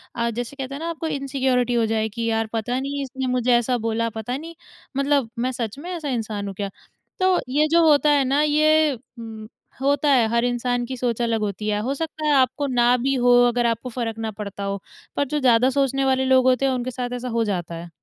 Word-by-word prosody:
अ, 235 Hz, 0 st, 0 dB
जैसे 240 Hz, +3 st, -5 dB
कहते 270 Hz, -1 st, -5 dB
हैं -, -, -6 dB
ना 335 Hz, -, -3 dB
आपको 330 Hz, -1 st, -4 dB
इनसिक्योरिटी 265 Hz, -4 st, 0 dB
हो 230 Hz, -1 st, +2 dB
जाए 220 Hz, 0 st, 0 dB
कि 230 Hz, +2 st, -4 dB
यार 225 Hz, 0 st, 0 dB
पता 235 Hz, +3 st, -1 dB
नहीं 280 Hz, +1 st, -3 dB
इसने 265 Hz, 0 st, -4 dB
मुझे 250 Hz, 0 st, +2 dB
ऐसा 245 Hz, +1 st, 0 dB
बोला, 230 Hz, 0 st, -1 dB
पता 225 Hz, +4 st, -4 dB
नहीं 330 Hz, +3 st, -9 dB, 0.4 s
मतलब 275 Hz, -3 st, +1 dB
मैं 255 Hz, +2 st, 0 dB
सच 235 Hz, -2 st, -4 dB
में 345 Hz, +5 st, -7 dB
ऐसा 320 Hz, -5 st, -4 dB
इंसान 215 Hz, -4 st, -3 dB
हूँ 195 Hz, -, -6 dB
क्या? 200 Hz, 0 st, -3 dB, 0.5 s
तो 370 Hz, -1 st, +3 dB
ये 300 Hz, +3 st, +2 dB
जो 335 Hz, -1 st, +5 dB
होता 295 Hz, 0 st, +4 dB
है 285 Hz, -2 st, +4 dB
ना 275 Hz, +3 st, +2 dB
ये 305 Hz, 0 st, +3 dB, 0.3 s
उम, 220 Hz, -1 st, -8 dB, 0.3 s
होता 285 Hz, +1 st, +2 dB
है 245 Hz, -4 st, +4 dB
हर 235 Hz, +1 st, +1 dB
इंसान 245 Hz, 0 st, -1 dB
की 260 Hz, +1 st, -6 dB
सोच 240 Hz, -1 st, -1 dB
अलग 230 Hz, -1 st, +1 dB
होती 210 Hz, 0 st, -3 dB
है, 205 Hz, -, 0 dB
हो 250 Hz, +6 st, -1 dB
सकता 310 Hz, +1 st, -4 dB
है 300 Hz, -, +3 dB
आपको 270 Hz, +2 st, +2 dB
ना 245 Hz, -1 st, +3 dB
भी 270 Hz, +3 st, 0 dB
हो 245 Hz, -1 st, +3 dB, 0.2 s
अगर 240 Hz, 0 st, +1 dB
आपको 230 Hz, +2 st, -1 dB
फ़र्क 230 Hz, -2 st, -4 dB
ना 220 Hz, -1 st, -3 dB
पड़ता 200 Hz, -1 st, -7 dB
हो, 200 Hz, -1 st, -3 dB, 0.3 s
पर 285 Hz, -, +1 dB
जो 295 Hz, +3 st, -1 dB
ज़्यादा 250 Hz, -1 st, +4 dB
सोचने 270 Hz, 0 st, +1 dB
वाले 265 Hz, 0 st, +2 dB
लोग 260 Hz, -1 st, +4 dB
होते 255 Hz, +1 st, +3 dB
हैं, 270 Hz, -, +2 dB
उनके 255 Hz, 0 st, -3 dB
साथ 245 Hz, 0 st, -4 dB
ऐसा 250 Hz, 0 st, -4 dB
हो 230 Hz, -1 st, +1 dB
जाता 175 Hz, -5 st, -3 dB
है। 170 Hz, +1 st, -8 dB
250 Hz, 235 wpm, -23 LUFS, 230-275 Hz, 0.5 s, जो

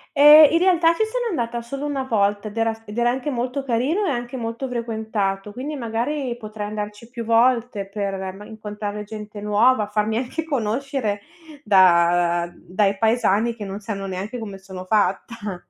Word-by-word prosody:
Ehm, 295 Hz, +2 st, +10 dB
in 330 Hz, -, +3 dB
realtà 345 Hz, -3 st, +4 dB
ci 440 Hz, -, +1 dB
sono 485 Hz, +3 st, -3 dB
andata 235 Hz, -5 st, -2 dB
solo 275 Hz, +4 st, -5 dB
1 275 Hz, -2 st, -2 dB
volta 205 Hz, -4 st, 0 dB
ed 210 Hz, -, -9 dB
era 225 Hz, 0 st, +1 dB
s 225 Hz, 0 st, -10 dB
ed 210 Hz, -1 st, -9 dB
era 240 Hz, 0 st, +3 dB
anche 265 Hz, +3 st, -2 dB
molto 250 Hz, +3 st, -2 dB
carino 270 Hz, -, 0 dB
e 315 Hz, -, +1 dB
anche 240 Hz, 0 st, -4 dB
molto 230 Hz, +3 st, -4 dB
frequentato, 220 Hz, -4 st, -2 dB
quindi 285 Hz, +5 st, -5 dB
magari 245 Hz, +1 st, -2 dB
potrei 215 Hz, -2 st, -6 dB
andarci 210 Hz, +2 st, -6 dB
più 235 Hz, -1 st, -6 dB
volte 230 Hz, -3 st, +2 dB
per 195 Hz, -2 st, -3 dB
ma 210 Hz, -, -11 dB
incontrare 210 Hz, -1 st, -6 dB
gente 210 Hz, 0 st, -8 dB
nuova, 210 Hz, +2 st, +3 dB
farmi 215 Hz, +1 st, 0 dB
anche 260 Hz, +6 st, -3 dB
conoscere 255 Hz, -5 st, -2 dB, 0.4 s
da 175 Hz, -3 st, +4 dB
dai 195 Hz, +3 st, 0 dB
paesani 225 Hz, 0 st, +2 dB
che 210 Hz, -3 st, -7 dB
non 195 Hz, +1 st, -6 dB
sanno 200 Hz, -2 st, -5 dB
neanche 195 Hz, +5 st, -5 dB
come 200 Hz, -4 st, -7 dB
sono 190 Hz, -1 st, -9 dB
fatta. 205 Hz, 0 st, -1 dB
225 Hz, 170 wpm, -22 LUFS, 205-250 Hz, 0.4 s, Ehm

